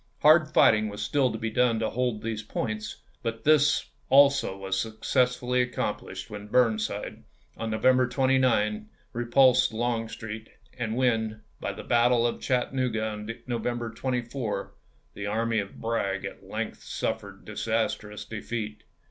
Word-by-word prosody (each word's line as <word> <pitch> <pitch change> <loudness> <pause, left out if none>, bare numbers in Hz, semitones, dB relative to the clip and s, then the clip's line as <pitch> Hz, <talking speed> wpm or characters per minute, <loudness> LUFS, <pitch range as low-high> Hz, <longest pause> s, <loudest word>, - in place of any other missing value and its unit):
Hard 155 +1 +6
fighting 110 -7 +5
was 105 - -5
still 135 -4 +2
to 110 - -4
be 110 0 -3
done 120 0 +3
im. - - -2
to 110 - 0
hold 120 -3 -1
these 110 -1 -3
points, 110 0 -4 0.2
but 115 -1 -4
this 145 -1 +3 0.2
also 140 -7 +5
was 95 0 -2
successfully 125 +2 +1
accomplished 105 -5 -3
when 105 -2 -8
Burnside, 110 -2 0 0.3
on 115 - -4
November 125 +3 +3
29, 125 -5 +2 0.2
repulsed 125 +1 +4
Longstreet; 115 -1 -3 0.3
and 115 -3 -3
when, 110 -4 0 0.2
by - - -3
the - - -8
battle 120 0 +3
of 120 - -1
Chattanooga 125 -3 0
on 105 0 -6 0.2
November 120 -1 -2
24, 120 -5 -3 0.4
the 100 0 -5
army 115 +1 0
of 100 -1 -6
Bragg 100 -4 -1
at - - -8
length - - -4
suffered - - -4
disastrous 110 -2 -2
defeat. 110 0 -5
115 Hz, 140 wpm, -27 LUFS, 110-125 Hz, 0.4 s, Hard